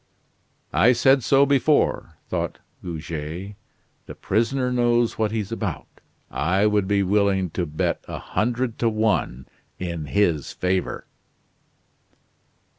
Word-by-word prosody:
"I 125 - +5
said 135 +3 +4
so 140 +3 +5
before," 140 +2 +1
thought - - -3 0.3
Goguet, 85 +3 -5 0.5
"the - - -8
prisoner 125 +5 0
knows 120 -2 +1
what 110 -1 +2
he's 110 -2 -3
about. 105 -7 -3 0.5
I 95 +4 +1
would 105 -2 +2
be 100 0 +2
willing 95 -2 +1
to 85 0 -2
bet 75 +1 -2
a - - -5
hundred 120 +3 -2
to 115 - +2
one 110 - 0 0.3
in 85 -4 -4
his 85 -4 0
favor." 90 0 -2
105 Hz, 115 wpm, -23 LUFS, 90-120 Hz, 0.5 s, I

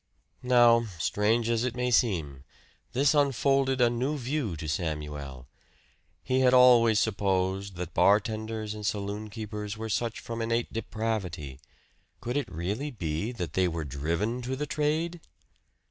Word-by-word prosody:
Now, 120 -2 +5
strange 110 +6 +1
as 115 0 +1
it 125 -1 -2
may 125 0 -1
seem, 80 - +1 0.5
this 140 +4 +3
unfolded 135 -1 +2
a 120 - +5
new 130 +5 -1
view 130 - -2
to 80 0 -6
Samuel. 75 -5 -4 0.8
He 130 0 +1
had 130 -1 +5
always 120 -4 +6
supposed 95 -2 0
that 90 -2 -6
bartenders 110 +1 +1
and 105 -1 -8
saloonkeepers 105 +1 -4
were 110 0 -5
such 115 +2 -1
from 115 0 -5
innate 115 +1 -1
depravity. 100 -11 -3 0.6
Could 120 +2 -4
it 145 -4 -2
really 100 - -3
be 90 - -3
that 90 - -5
they 95 -1 +2
were 80 -2 -3
driven 85 - -2
to 130 +2 -3
the 150 +3 -3
trade? 155 +3 -1
110 Hz, 140 wpm, -28 LUFS, 95-125 Hz, 0.8 s, always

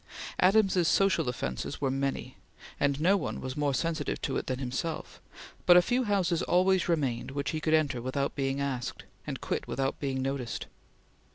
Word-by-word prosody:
Adams's 190 -2 +4
social 185 -8 +3
offences 65 - -4
were 135 -2 0
many, 135 0 -2 0.4
and 140 0 +1
no 180 +6 +4
one 190 - -2
was 130 0 -5
more 145 -1 +1
sensitive 160 +2 -1
to 135 - -2
it - - -2
than 130 - -1
himself; 135 +5 -4 0.5
but 175 - +9
a - - +8
few 250 +4 +1
houses 185 -5 +1
always 185 0 +3
remained 135 -8 0
which 140 +1 -2
he 155 - -3
could 155 0 +3
enter 145 -6 +1
without 140 +3 -1
being 135 0 -1
asked, 135 -4 -3 0.2
and - - -4
quit - - -2
without 135 0 -1
being 135 -2 -2
noticed. 130 -3 -3
145 Hz, 175 wpm, -29 LUFS, 135-175 Hz, 0.5 s, but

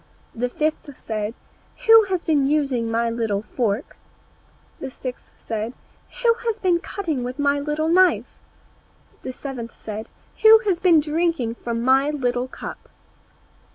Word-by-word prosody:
The 245 +2 -2
fifth 300 0 -3
said, 215 0 -4 0.5
"Who 450 -1 +8
has 370 -3 -2
been 290 -4 +2
using 275 -6 0
my 230 +1 +1
little 220 -3 -1
fork?" 225 +2 -2 0.8
The 270 - -5
sixth 255 -1 -8 0.2
said, 220 +1 -3 0.5
"Who 465 -1 +6
has 450 -2 0
been 365 -5 +2
cutting 340 -7 -3
with 250 +2 -5
my 285 0 +2
little 300 +2 -1
knife?" 365 +2 +3 0.8
The - - -5
seventh 250 -3 -7
said, 215 0 -6 0.3
"Who 440 0 +9
has 375 -4 +1
been 350 -4 +5
drinking 305 -6 0
from 235 0 -4
my 265 +3 +4
little 250 -4 -1
cup?" - - -9
275 Hz, 140 wpm, -22 LUFS, 235-330 Hz, 0.8 s, Who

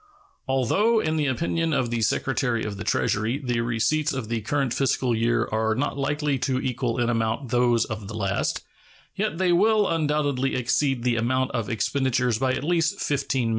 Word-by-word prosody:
Although, 190 - +2
in 160 -5 0
the 150 -2 +1
opinion 165 +4 0
of 120 -4 0
the 120 -1 -1
Secretary 120 +2 0
of 105 -2 -4
the 100 - -6
Treasury, 110 +5 0
the 125 -5 -1
receipts 120 +7 0
of 130 -5 -4
the 115 -1 -1
current 135 +3 -1
fiscal 130 -3 +1
year 115 +1 +1
are 110 0 +1
not 130 +4 -1
likely 145 0 -1
to 130 +1 0
equal 125 -2 -2
in 120 - +1
amount 115 +1 -1
those 120 -2 +3
of 110 -2 -6
the 105 - -7
last, 100 -2 -1 0.5
yet 160 - -2
they 185 -1 +2
will 210 +3 +4
undoubtedly 145 -4 0
exceed 130 +1 0
the 120 -2 +1
amount 130 +3 0
of 115 -3 -3
expenditures 125 +1 0
by 130 0 +1
at 130 - -3
least 165 0 +1
$15,000,000. 135 -4 -1
130 Hz, 180 wpm, -25 LUFS, 115-145 Hz, 0.5 s, will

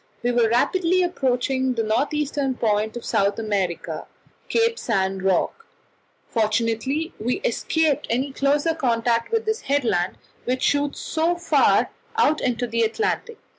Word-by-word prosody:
We 245 - +2
were 240 -2 +3
rapidly 360 +9 +2
approaching 260 -5 0
the 225 - 0
north 225 +8 +1
eastern 290 -3 -1
point 220 0 0
of 240 - -8
South 200 +1 +1
America 200 -6 -2 0.4
Cape 460 -1 +2
San 195 -4 0
Roque. 195 - 0 0.6
Fortunately 230 - 0
we 240 +4 0
escaped 320 - 0
any 260 +4 0
closer 290 +4 +1
contact 235 - 0
with 455 -1 0
this 440 0 -1
headland, 220 -11 0 0.3
which 255 +1 -1
shoots 285 0 +1
so 325 +2 0
far 345 - +3 0.3
out 310 -8 +3
into 245 -1 0
the 230 0 -1
Atlantic. 425 - -1
255 Hz, 135 wpm, -23 LUFS, 225-315 Hz, 0.6 s, were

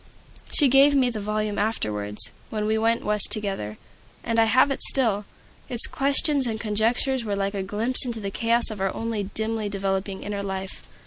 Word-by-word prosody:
She 290 - +4
gave 275 +2 +5
me 255 -3 +2
the 220 - -5
volume 210 0 -3
afterwards, 105 - -2 0.2
when 215 -1 -3
we 215 +1 0
went 230 +1 0
West 210 -1 +4
together, 195 - +2 0.5
and 230 -1 -1
I 225 - +5
have 255 +5 +3
it 275 - -4
still. 220 -6 +1 0.4
Its 240 -3 +3
questions 280 0 +2
and 220 -1 -4
conjectures 235 +4 0
were 205 -2 -3
like 200 0 -2
a 200 - -3
glimpse 215 +6 +3
into 240 -3 -3
the 200 -2 -5
chaos 230 +2 0
of 205 -3 -7
our 195 -1 0
own 220 -4 -4
dimly 220 -1 -2
developing 195 -1 -3
inner 205 -1 -5
life. 190 -1 -6
215 Hz, 185 wpm, -23 LUFS, 200-235 Hz, 0.5 s, gave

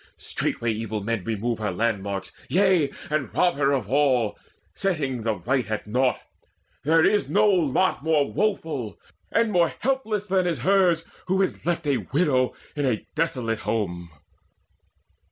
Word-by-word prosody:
Straightway 115 -1 -2
evil 110 -1 -3
men 115 -2 -2
remove 115 +1 -2
Her 105 -1 -1
landmarks, 100 -1 -2 0.2
yea, 185 -5 +3 0.2
and 150 -4 -1
rob 180 -1 +3
her 140 -1 +2
of 135 -6 0
her 105 - -11
all, 130 -7 +2 0.4
Setting 145 -10 -1
the 110 -1 0
right 120 +4 -1
at 110 -1 -3
naught. 125 +4 +1 0.6
There 160 +2 +4
is 210 - +2
no 210 +2 +4
lot 180 -4 +2
More 155 -3 +2
woeful 160 - -1 0.3
and 230 -1 +2
more 175 -4 +3
helpless 225 -6 0
than 185 -2 +1
is 170 - -1
hers 180 -4 +3 0.2
Who 190 +1 +2
is 185 - -3
left 170 -2 0
a 140 -3 +2
widow 130 - +1 0.2
in 145 -2 0
a 115 -4 -1
desolate 125 -9 -1
home." 90 -7 -2
140 Hz, 155 wpm, -25 LUFS, 115-180 Hz, 0.6 s, There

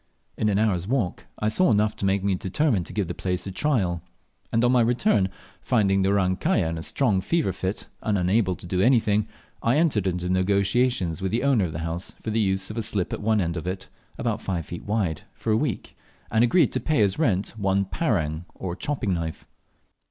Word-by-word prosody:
In 105 - +1
an 100 - +2
hour's 100 -5 +1
walk 115 -8 -1
I 105 - -1
saw 145 +12 +3
enough 105 -1 +2
to 100 - -1
make 95 0 +1
me 100 -1 +2
determine 100 - 0
to - - -9
give 100 -4 -1
the 85 - -3
place 90 -1 -3
a 95 - -4
trial, 95 - 0 0.5
and 115 - +2
on 120 - +4
my 125 -1 +4
return, 115 - +2 0.3
finding 100 -5 +2
the 95 - +2
"Orang 95 -2 +2
kaya" 165 - +1
was 80 - -1
in 85 - -4
a - - -5
strong 105 - +1
fever 155 - 0
fit 95 +2 -3 0.2
and 105 -2 0
unable 95 +1 +2
to - - -12
do 90 +1 0
anything, 110 -3 +3 0.3
I 120 +5 +2
entered 140 - +2
into 90 -1 -1
negotiations 95 0 +1
with 95 - -1
the 115 +4 0
owner 130 -8 +3
of 85 - -4
the 75 - -5
house 85 +2 -4
for 110 - -4
the 110 +1 +1
use 95 -1 0
of 110 - -8
a - - 0
slip 105 -4 -2
at - - -4
one 110 0 +2
end 85 -3 -1
of 85 0 -5
it 95 +1 -4 0.3
about - - -2
five 90 -4 -3
feet 85 - -8
wide, 100 -7 -1
for 110 - -2
a - - +4
week, - - -2 0.4
and 110 +1 +4
agreed 165 +9 +4
to - - 0
pay 150 -9 +2
as 100 +4 0
rent 105 - +1
one 100 -2 +1
"parang," 85 - -1
or 90 -2 -4
chopping 110 -4 -2
knife. 80 -2 -4
100 Hz, 225 wpm, -25 LUFS, 90-115 Hz, 0.5 s, on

